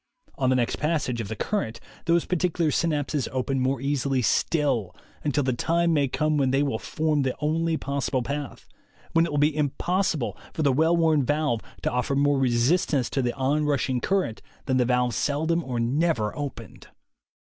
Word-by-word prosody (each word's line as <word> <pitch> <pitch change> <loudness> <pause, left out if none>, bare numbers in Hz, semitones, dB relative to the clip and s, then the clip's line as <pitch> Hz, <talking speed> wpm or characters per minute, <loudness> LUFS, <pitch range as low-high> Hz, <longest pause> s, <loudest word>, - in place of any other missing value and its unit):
On 130 -2 0
the 130 - +3
next 120 -2 0
passage 145 -6 -1
of 105 - -5
the 110 - -4
current 115 - -2 0.3
those 170 0 +2
particular 175 -3 0
synapses 150 -4 0
open 130 +1 -1
more 130 0 0
easily 135 -1 0
still, 125 - +1 0.3
until 145 -1 +1
the 130 0 +1
time 170 +6 +1
may 145 -3 +2
come 155 +3 0
when 135 -2 +2
they 135 +2 +2
will 135 -6 -1
form 155 -2 0
the 130 -2 -1
only 160 +2 0
pos 140 -2 -2
sible 130 -3 0
path, 145 0 -5 0.4
when 165 +1 +3
it - - -6
will 145 - -1
be 150 +1 +3
impossible 155 - 0 0.2
for 160 - -1
the 140 -2 +3
well 160 +5 +3
worn 160 -4 +3
valve 145 -4 0 0.2
to - - 0
offer 125 +3 0
more 140 0 +3
resistance 130 +2 +2
to 135 - 0
the 120 -1 -1
on 140 +3 +1
rush 140 -2 0
ing 125 -1 0
current 190 - 0 0.2
than 130 -2 +1
the 125 - +3
valve 125 -1 +1
seldom 160 +4 0
or 125 -4 -3
never 125 -2 0
opened. 145 -3 -7
140 Hz, 190 wpm, -25 LUFS, 130-155 Hz, 0.4 s, the